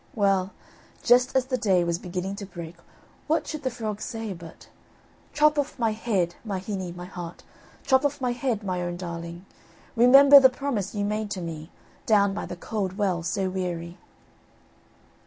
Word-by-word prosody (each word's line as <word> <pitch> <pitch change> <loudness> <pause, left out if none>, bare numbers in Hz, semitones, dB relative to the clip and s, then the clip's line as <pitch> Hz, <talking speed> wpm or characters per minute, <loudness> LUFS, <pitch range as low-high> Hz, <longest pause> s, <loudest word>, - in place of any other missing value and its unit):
Well, 195 -3 +2 0.5
just 250 +1 +4
as 260 -1 +3
the 255 -1 -2
day 185 -4 +3
was 170 0 -1
beginning 185 +2 -4
to 200 - -6
break 170 -2 -8 0.5
what 315 +2 +1
should 310 -2 -5
the 260 - -1
frog 215 -3 -5
say 225 -4 -4
but: 170 -2 -12 0.6
"Chop 300 0 +3
off 285 - -2
my 230 -3 +1
head, 205 -6 -1
my 205 -4 -3
hinny, 190 -2 -4
my 175 +1 -8
heart, 175 -2 -8 0.4
Chop 265 0 +4
off 290 0 0
my 250 -2 0
head, 240 -3 -2
my 185 -2 -2
own 175 0 -3
darling; 170 0 -7 0.5
Remember 275 +4 +9
the 260 -1 +7
promise 250 -7 -3
you 205 0 -1
made 210 0 -2
to 195 -2 -4
me, 160 -1 -6 0.4
Down 200 -2 +4
by 205 - -4
the - - -6
cold 195 0 -4
well 190 -5 0
so 190 +3 -1
weary." 175 -2 -4
200 Hz, 175 wpm, -26 LUFS, 180-245 Hz, 0.6 s, Remember